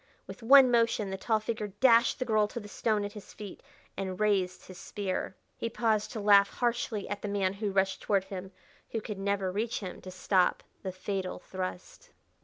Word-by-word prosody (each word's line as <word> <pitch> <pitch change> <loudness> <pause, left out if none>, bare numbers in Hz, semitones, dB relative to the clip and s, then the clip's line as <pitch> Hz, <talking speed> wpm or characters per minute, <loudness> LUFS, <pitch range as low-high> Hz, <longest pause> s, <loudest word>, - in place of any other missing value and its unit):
With - - -10
one 260 +2 +8
motion 230 -4 +2
the 190 - -3
tall 220 0 +1
figure 215 -1 -3
dashed 235 -2 +5
the 255 - -2
girl 215 -3 +2
to 235 - -6
the 205 - -10
stone 210 0 0
at 205 - -5
his 210 -1 -12
feet 205 -3 -9 0.3
and 190 -1 -4
raised 190 -4 +1
his 185 -1 -11
spear. 190 -2 -4 0.2
He 230 - -3
paused 220 -2 0
to 220 - -4
laugh 200 -1 +6
harshly 235 -3 -1
at 205 0 -4
the - - -4
man 195 -2 0
who 200 0 -3
rushed 190 -1 +1
toward 200 -2 +1
him 190 -1 -7 0.4
who 225 - -2
could 210 -2 -6
never 195 -1 0
reach 220 +4 -2
him 185 -3 -7
to 185 - -9
stop 185 0 +1 0.2
the 190 - -4
fatal 185 0 -4
thrust. 185 - -7
205 Hz, 200 wpm, -30 LUFS, 190-220 Hz, 0.4 s, one